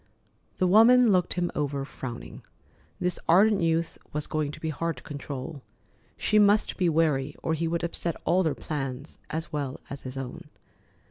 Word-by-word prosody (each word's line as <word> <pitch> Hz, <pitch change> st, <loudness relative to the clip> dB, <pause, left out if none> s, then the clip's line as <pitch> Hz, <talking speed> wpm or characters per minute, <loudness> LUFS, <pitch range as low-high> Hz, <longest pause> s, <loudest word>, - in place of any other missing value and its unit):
The 185 Hz, -, +2 dB
woman 225 Hz, +5 st, +7 dB
looked 180 Hz, -2 st, +2 dB
him 175 Hz, -1 st, 0 dB
over, 140 Hz, -2 st, -2 dB
frowning. 125 Hz, -4 st, -8 dB, 0.6 s
This 180 Hz, 0 st, -1 dB
ardent 200 Hz, +4 st, +5 dB
youth 165 Hz, 0 st, 0 dB
was 150 Hz, 0 st, -2 dB
going 155 Hz, -2 st, -1 dB
to -, -, -10 dB
be 160 Hz, -, -3 dB
hard 165 Hz, +2 st, -2 dB
to -, -, -12 dB
control. 145 Hz, 0 st, -6 dB, 0.6 s
She 215 Hz, -, +3 dB
must 205 Hz, +1 st, +4 dB
be 180 Hz, -3 st, +2 dB
wary 150 Hz, -4 st, +1 dB
or 160 Hz, -, 0 dB
he 165 Hz, +1 st, -1 dB
would 170 Hz, +1 st, -1 dB
upset 170 Hz, 0 st, -2 dB
all 185 Hz, +2 st, +3 dB
her 155 Hz, -, +1 dB
plans, 135 Hz, -1 st, -5 dB
as 160 Hz, +1 st, -4 dB
well 140 Hz, -3 st, -3 dB
as 140 Hz, -, -6 dB
his 130 Hz, +1 st, -7 dB
own. 130 Hz, -2 st, -7 dB
160 Hz, 175 wpm, -27 LUFS, 140-180 Hz, 0.6 s, woman